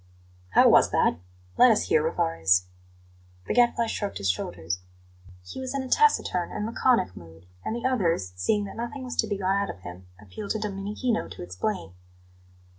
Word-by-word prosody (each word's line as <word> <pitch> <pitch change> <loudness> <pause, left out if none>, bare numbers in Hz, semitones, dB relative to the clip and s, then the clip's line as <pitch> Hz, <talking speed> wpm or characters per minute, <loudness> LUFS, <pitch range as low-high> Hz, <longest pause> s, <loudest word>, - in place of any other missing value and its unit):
"How - - +7
was - - +6
that? 80 - +2 0.4
Let 250 - +8
us 220 - +3
hear, 155 - +4
Rivarez." 160 - +2 0.8
The - - -1
Gadfly 240 -1 +3
shrugged 205 -2 -3
his 95 -1 +2
shoulders. 85 -1 -4 0.7
He 90 - -8
was 260 +1 -4
in 275 - -1
a - - -6
taciturn 250 - +2
and 210 - -3
laconic 230 - +1
mood, 80 0 -14 0.2
and 220 - -3
the 240 - -5
others, 170 - 0
seeing 205 - +1
that 200 - -8
nothing 240 +4 -5
was 250 -1 -5
to 220 - +2
be 205 -1 -2
got 195 +1 +1
out 200 - -2
of 90 - -8
him, 90 0 -10
appealed 105 - -9
to 220 - -3
Domenichino 210 +3 -2
to - - -8
explain. 95 - -4
195 Hz, 180 wpm, -26 LUFS, -, 0.8 s, Let